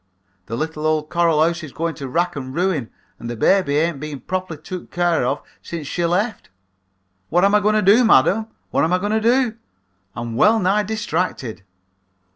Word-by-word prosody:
The 115 - -4
little 155 +1 -2
old 155 -1 0
coral 165 -3 +3
house 170 +2 0
is 155 -4 -8
going 165 +3 -2
to 135 - -4
wrack 175 +6 0
and 130 -1 -6
ruin 170 -9 0 0.3
and 120 - -6
the 120 - -4
baby 145 - +2
ain't 160 -2 0
been 150 -1 -6
properly 185 -3 -4
took 180 +3 -8
care 175 -5 +1
of 135 +4 -1 0.2
since 165 -3 -6
she 175 +5 -2
left. 200 +7 -1 0.8
What 175 +3 +3
am 200 - +3
I 210 - +6
going 210 +1 +2
to 215 - +2
do, 210 +6 +6
madam? 220 - +4 0.2
What - - +2
am 165 +3 +1
I - - +4
going 205 +3 -2
to 220 0 +1
do? 235 0 +2 0.6
I'm 120 -1 -5
well 215 - +5
nigh 200 +1 +2
distracted.' 180 - -3
170 Hz, 195 wpm, -20 LUFS, 150-200 Hz, 0.8 s, I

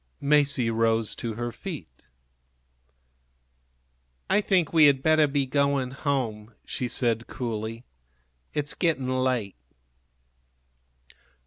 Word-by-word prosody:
Masie 140 -4 +3
rose 115 -1 +1
to 115 -2 -5
her 120 +1 -3
feet. 130 - -9 2.2
"I 210 - +4
think 185 -6 +1
we 160 -2 +7
had 135 -2 +4
better 155 -1 +4
be 140 -1 0
going 140 -1 0
home," 120 -6 -3
she 125 - -3
said, 115 -1 0
coolly. 115 -1 -5 0.7
"It's 150 -1 -2
getting 160 -7 0
late." 130 - -1
130 Hz, 100 wpm, -26 LUFS, 115-145 Hz, 2.2 s, we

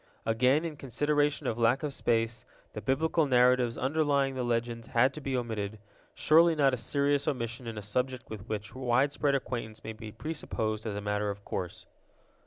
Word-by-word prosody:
Again, 125 +8 +3
in 155 -3 -5
consideration 145 +3 0
of 120 -2 -1
lack 120 +4 +3
of 145 -2 -2
space 115 -3 0 0.3
the - - -5
Biblical 155 +3 +1
narratives 125 -2 +4
underlying 140 -1 +1
the 130 - -3
legends 115 -1 -2
had 130 +3 +3
to 155 - -8
be 135 -2 -1
omitted—surely 115 +9 +1
not 140 -3 +3
a - - 0
serious 140 +4 +1
omission 120 -3 -3
in 115 -1 -5
a 105 - -5
subject 125 +4 -2
with 110 0 -9
which 105 -1 -4
widespread 135 +3 +1
acquaintance 115 -5 -4
may 110 - -5
be 110 -1 -9
presupposed 110 -7 -3
as 105 - -3
a 100 - -3
matter 105 0 -1
of 100 0 -6
course. 90 -2 -5
125 Hz, 175 wpm, -30 LUFS, 110-140 Hz, 0.3 s, narratives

